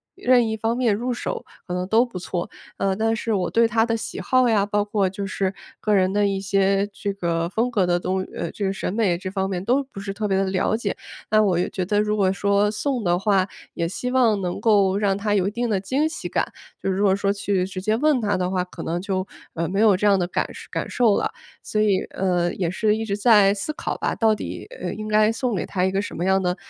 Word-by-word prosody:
任 250 Hz, -9 st, +3 dB
一 220 Hz, 0 st, -2 dB
方 225 Hz, +2 st, 0 dB
面 235 Hz, -5 st, +2 dB
入 245 Hz, +3 st, -2 dB
手 -, -, -4 dB, 0.2 s
可 180 Hz, -, -4 dB
能 180 Hz, 0 st, -2 dB
都 225 Hz, +4 st, +4 dB
不 235 Hz, -7 st, -8 dB
错。 175 Hz, 0 st, -4 dB, 0.3 s
呃， 195 Hz, -1 st, 0 dB
但 225 Hz, +1 st, +1 dB
是 225 Hz, +1 st, -3 dB
我 185 Hz, -3 st, 0 dB
对 230 Hz, 0 st, +4 dB
他 225 Hz, +1 st, +2 dB
的 230 Hz, -1 st, 0 dB
喜 225 Hz, -, -5 dB
好 255 Hz, -2 st, +3 dB
呀， 205 Hz, -3 st, +3 dB
包 205 Hz, 0 st, 0 dB
括 205 Hz, -2 st, 0 dB
就 195 Hz, +1 st, -5 dB
是 190 Hz, 0 st, -1 dB, 0.3 s
个 210 Hz, -, 0 dB
人 190 Hz, -1 st, +3 dB
的 205 Hz, 0 st, +2 dB
一 195 Hz, -1 st, -1 dB
些 195 Hz, 0 st, +2 dB
这 200 Hz, 0 st, -4 dB
个 170 Hz, -3 st, -1 dB
风 230 Hz, +5 st, 0 dB
格 205 Hz, -6 st, +1 dB
的 175 Hz, 0 st, +1 dB
东， 185 Hz, +1 st, -1 dB
呃， 165 Hz, -, -3 dB
这 205 Hz, -, -3 dB
个 195 Hz, -, 0 dB
审 185 Hz, -, -3 dB
美 205 Hz, -5 st, +1 dB
这 185 Hz, -, -5 dB
方 190 Hz, 0 st, -1 dB
面 180 Hz, -1 st, -3 dB
都 255 Hz, +6 st, +2 dB
不 260 Hz, -7 st, -11 dB
是 195 Hz, 0 st, -5 dB
特 210 Hz, 0 st, -2 dB
别 195 Hz, -, +1 dB
地 195 Hz, -, +2 dB
了 195 Hz, +3 st, +1 dB
解， 215 Hz, -3 st, -2 dB, 0.3 s
那 215 Hz, 0 st, +4 dB
我 180 Hz, -4 st, +2 dB
也 -, -, 0 dB
觉 185 Hz, -2 st, -3 dB
得 205 Hz, +2 st, +2 dB
如 210 Hz, 0 st, 0 dB
果 190 Hz, -2 st, +3 dB
说 200 Hz, +1 st, +2 dB
送 255 Hz, +1 st, -2 dB
的 175 Hz, -1 st, +2 dB
话， 195 Hz, -2 st, +2 dB, 0.3 s
也 170 Hz, -1 st, -1 dB
希 250 Hz, +7 st, -4 dB
望 235 Hz, -5 st, +3 dB
能 180 Hz, -1 st, -3 dB
够 200 Hz, -3 st, +3 dB
让 200 Hz, -2 st, +1 dB
他 205 Hz, 0 st, 0 dB
有 190 Hz, -1 st, +2 dB
一 -, -, -1 dB
定 240 Hz, +1 st, -2 dB
的 200 Hz, -3 st, +1 dB
惊 275 Hz, +10 st, 0 dB
喜 -, -, -6 dB
感， -, -, -1 dB, 0.3 s
就 -, -, -1 dB
是 190 Hz, -, 0 dB
如 205 Hz, -, +1 dB
果 195 Hz, -2 st, +4 dB
说 200 Hz, 0 st, 0 dB
去 200 Hz, -2 st, 0 dB
直 190 Hz, -1 st, -6 dB
接 215 Hz, +2 st, +1 dB
问 295 Hz, -1 st, +3 dB
他 205 Hz, -1 st, +1 dB
的 180 Hz, 0 st, -1 dB
话， 180 Hz, -1 st, 0 dB
可 180 Hz, -, -10 dB
能 170 Hz, +2 st, -2 dB
就， 190 Hz, -1 st, -2 dB, 0.3 s
呃， 165 Hz, 0 st, -2 dB
没 195 Hz, +2 st, -1 dB
有 215 Hz, -3 st, +5 dB
这 210 Hz, -, +1 dB
样 200 Hz, -, +5 dB
的 175 Hz, -2 st, 0 dB
感 -, -, -1 dB
受 -, -, -11 dB
感 -, -, -2 dB
受 230 Hz, -5 st, +3 dB
了， -, -, -1 dB, 0.3 s
所 215 Hz, -, -1 dB
以， 200 Hz, -3 st, +3 dB
呃， 180 Hz, -2 st, 0 dB
也 175 Hz, -3 st, -1 dB
是 210 Hz, +3 st, +1 dB
一 220 Hz, -, -3 dB
直 200 Hz, -1 st, -2 dB
在 210 Hz, -3 st, +6 dB
思 305 Hz, +10 st, -3 dB
考 335 Hz, -, -4 dB
吧， -, -, -1 dB
到 220 Hz, -2 st, +3 dB
底， -, -, -6 dB
呃， -, -, -3 dB
应 215 Hz, 0 st, -6 dB
该 215 Hz, 0 st, +4 dB
送 235 Hz, -1 st, -1 dB
给 -, -, -2 dB
他 185 Hz, -2 st, -2 dB
一 190 Hz, -, +1 dB
个 195 Hz, +1 st, 0 dB
什 -, -, -7 dB
么 175 Hz, -, -2 dB
样 190 Hz, 0 st, +3 dB
的 180 Hz, 0 st, 0 dB
200 Hz, 290 characters per minute, -23 LUFS, 190-220 Hz, 0.3 s, 在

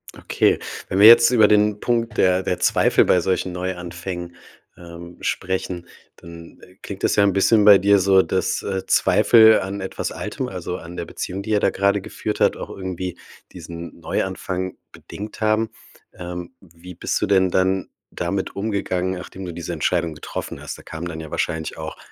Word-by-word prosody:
Okay, -, -, +1 dB, 0.3 s
wenn 95 Hz, -, -1 dB
wir 105 Hz, -, +9 dB
jetzt 120 Hz, +1 st, +8 dB
über 110 Hz, -4 st, +5 dB
den 105 Hz, 0 st, +3 dB
Punkt 115 Hz, -2 st, -1 dB
der 90 Hz, 0 st, +3 dB
der 90 Hz, -1 st, -2 dB
Zweifel -, -, +3 dB
bei 90 Hz, -, +3 dB
solchen 95 Hz, +1 st, -1 dB
Neuanfängen, 90 Hz, -1 st, -6 dB, 0.4 s
ähm, 85 Hz, 0 st, -11 dB
sprechen, 90 Hz, -2 st, -3 dB, 0.3 s
dann, 85 Hz, 0 st, -13 dB
äh, 90 Hz, -, -17 dB
klingt 100 Hz, -2 st, -8 dB
das -, -, +2 dB
ja 100 Hz, -, +4 dB
'n 100 Hz, -1 st, +3 dB
bisschen 105 Hz, +2 st, +3 dB
bei 105 Hz, -2 st, +9 dB
dir 100 Hz, +2 st, +4 dB
so, 95 Hz, 0 st, +5 dB
dass, 95 Hz, 0 st, -1 dB
äh, 95 Hz, -1 st, -4 dB
Zweifel 110 Hz, -1 st, +5 dB
an 100 Hz, +1 st, -5 dB
etwas 95 Hz, -, -4 dB
Altem, -, -, -5 dB
also 90 Hz, -, -5 dB
an 85 Hz, 0 st, -10 dB
der 85 Hz, -1 st, -5 dB
Beziehung, 95 Hz, +3 st, -5 dB
die 100 Hz, -, -8 dB
ihr 105 Hz, -1 st, +3 dB
da -, -, +2 dB
gerade 100 Hz, +1 st, +1 dB
geführt 95 Hz, -, -5 dB
habt, -, -, +3 dB
auch -, -, -7 dB
irgendwie 95 Hz, -2 st, -5 dB, 0.4 s
diesen 85 Hz, 0 st, -9 dB
Neuanfang 95 Hz, +2 st, -3 dB
bedingt 105 Hz, +2 st, -10 dB
haben. 110 Hz, +1 st, +1 dB, 0.4 s
Ähm, 90 Hz, -1 st, -7 dB
wie 85 Hz, 0 st, -13 dB
bist -, -, -2 dB
du -, -, +2 dB
denn 95 Hz, -2 st, +3 dB
dann 95 Hz, +1 st, 0 dB, 0.2 s
damit 95 Hz, +2 st, -3 dB
umgegangen, 100 Hz, -3 st, -2 dB
nachdem 95 Hz, +1 st, -8 dB
du 90 Hz, -, -6 dB
diese 85 Hz, +1 st, -5 dB
Entscheidung 85 Hz, +1 st, -1 dB
getroffen 75 Hz, -, -7 dB
hast? -, -, -7 dB
Da -, -, -15 dB
kamen 80 Hz, +2 st, -7 dB
dann 80 Hz, -2 st, -6 dB
ja 80 Hz, -1 st, -9 dB
wahrscheinlich 80 Hz, -1 st, -3 dB
auch 80 Hz, 0 st, -7 dB
95 Hz, 180 wpm, -21 LUFS, 85-100 Hz, 0.4 s, wir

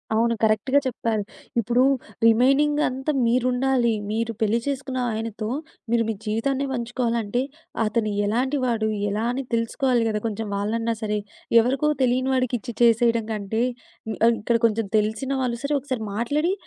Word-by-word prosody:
అవును 230 Hz, +1 st, +2 dB
కరెక్ట్‌గా 220 Hz, +6 st, +3 dB
చెప్పారు. 225 Hz, -3 st, -1 dB, 0.4 s
ఇప్పుడు 240 Hz, +3 st, +2 dB, 0.4 s
రిమైనింగ్ 275 Hz, +6 st, +4 dB
అంతా 265 Hz, +4 st, -2 dB
మీరుండాలి. 250 Hz, 0 st, +2 dB, 0.2 s
మీరు 230 Hz, +1 st, -1 dB
పెళ్లి 220 Hz, +2 st, +2 dB
చేసుకున్న 265 Hz, -2 st, -2 dB
ఆయనతో 220 Hz, -1 st, -4 dB, 0.4 s
మీరు 235 Hz, -1 st, +3 dB
మీ -, -, +1 dB
జీవితాన్నే 260 Hz, +6 st, 0 dB
పంచుకోవాలంటే 235 Hz, -2 st, -1 dB, 0.4 s
అతను 215 Hz, 0 st, 0 dB, 0.2 s
ఎలాంటి 255 Hz, +7 st, 0 dB
వాడు, 225 Hz, -3 st, 0 dB, 0.2 s
ఎలా 210 Hz, +3 st, -1 dB
అని 270 Hz, +2 st, -3 dB
తెలుసుకోవాలి 235 Hz, +1 st, +1 dB
కదా! 210 Hz, -1 st, -1 dB
కొంచెం 220 Hz, 0 st, -4 dB
వాళ్ళన్నా 225 Hz, +3 st, -1 dB
సరే. 210 Hz, -1 st, 0 dB, 0.4 s
ఎవరికో 265 Hz, +6 st, +2 dB
తెలియని 255 Hz, +1 st, +1 dB
వాడికిచ్చి 250 Hz, -1 st, -1 dB
చేసేయడం 230 Hz, -1 st, +4 dB
కంటే, 215 Hz, +2 st, -2 dB, 0.6 s
ఆహ్, 235 Hz, 0 st, +5 dB
ఇక్కడ 230 Hz, +2 st, +2 dB
కొంచెం 225 Hz, 0 st, -1 dB
తెలిసిన 220 Hz, +5 st, -1 dB
వాళ్ళు 240 Hz, -2 st, -1 dB
సరే 290 Hz, +1 st, +1 dB
ఒకసారి 260 Hz, -4 st, -4 dB
మాట్లాడి 295 Hz, -, 0 dB
235 Hz, 135 wpm, -24 LUFS, 220-255 Hz, 0.6 s, ఆహ్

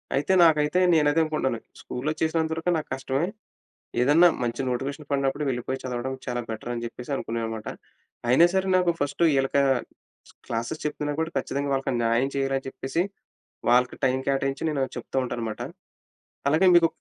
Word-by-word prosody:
అయితే, 145 Hz, +7 st, +1 dB
నాకైతే 155 Hz, +1 st, +4 dB
నేనదే 150 Hz, 0 st, +4 dB
అనుకుంటున్నాను. 150 Hz, -6 st, -1 dB, 0.2 s
స్కూల్‌లో 140 Hz, +5 st, -3 dB
చేసినంత 160 Hz, 0 st, +1 dB
వరకు 165 Hz, +2 st, 0 dB
నాకు 155 Hz, -, -5 dB
కష్టమే. 135 Hz, +4 st, -1 dB, 0.7 s
ఏదన్నా 150 Hz, +7 st, +6 dB, 0.2 s
మంచి 120 Hz, +2 st, -2 dB
నోటిఫికేషన్ 140 Hz, +4 st, -3 dB
పడినప్పుడు 140 Hz, +1 st, 0 dB
వెళ్ళిపోయి 130 Hz, +1 st, -3 dB
చదవడం 130 Hz, +1 st, -3 dB
చాలా 120 Hz, -1 st, -2 dB
బెటర్ 110 Hz, +2 st, -5 dB
అని 120 Hz, -, -4 dB
చెప్పేసి 125 Hz, +4 st, -7 dB
అనుకున్నాననమాట. 115 Hz, -3 st, -4 dB, 0.6 s
అయినా 130 Hz, +8 st, +6 dB
సరే 190 Hz, 0 st, +1 dB
నాకు 180 Hz, -2 st, +3 dB
ఫస్ట్ 145 Hz, +4 st, 0 dB
వీళ్ళకి 135 Hz, 0 st, +2 dB, 0.9 s
క్లాసెస్ 115 Hz, +7 st, -3 dB
చెప్తున్నా 150 Hz, 0 st, -2 dB
కూడా 160 Hz, +1 st, -1 dB
ఖచ్చితంగా 140 Hz, +1 st, -2 dB
వాళ్ళకి 135 Hz, 0 st, 0 dB
న్యాయం 115 Hz, +4 st, +2 dB
చేయాలని 135 Hz, 0 st, 0 dB
చెప్పేసి 135 Hz, +5 st, -2 dB, 0.7 s
వాళ్ళకి, 125 Hz, +1 st, +3 dB
టైమ్ 130 Hz, 0 st, +2 dB
కేటాయించి 135 Hz, 0 st, 0 dB
నేనది 135 Hz, -3 st, -1 dB
చెప్తూ -, -, -6 dB
ఉంటాననమాట. 115 Hz, -3 st, -4 dB, 0.9 s
అలాగే 160 Hz, +6 st, +4 dB
మీకు 170 Hz, -1 st, +7 dB
135 Hz, 145 wpm, -26 LUFS, 125-155 Hz, 0.9 s, మీకు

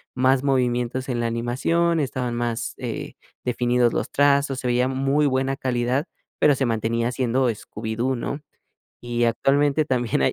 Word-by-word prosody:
más 130 Hz, +1 st, +3 dB
movimientos 125 Hz, -1 st, 0 dB
en 120 Hz, -1 st, -1 dB
la 115 Hz, -, 0 dB
animación, 135 Hz, +9 st, 0 dB
estaban 125 Hz, -3 st, -2 dB
más, 120 Hz, -1 st, -2 dB
eh, -, -, -5 dB, 0.3 s
definidos 120 Hz, -1 st, +2 dB
los -, -, -2 dB
trazos, 140 Hz, -1 st, +2 dB
se 125 Hz, -, -3 dB
veía 125 Hz, +1 st, +2 dB
muy 135 Hz, +3 st, +1 dB
buena 135 Hz, 0 st, 0 dB
calidad, 125 Hz, +4 st, 0 dB, 0.3 s
pero, 145 Hz, -2 st, +5 dB
se 135 Hz, -, 0 dB
mantenía 115 Hz, +1 st, 0 dB
siendo 125 Hz, 0 st, +1 dB
Scooby-Doo, 115 Hz, +4 st, -3 dB
¿no? 140 Hz, +4 st, -4 dB, 0.6 s
Y 120 Hz, 0 st, 0 dB
actualmente 140 Hz, +5 st, +2 dB
también 120 Hz, -, 0 dB
hay -, -, +2 dB
125 Hz, 150 wpm, -23 LUFS, 120-135 Hz, 0.6 s, pero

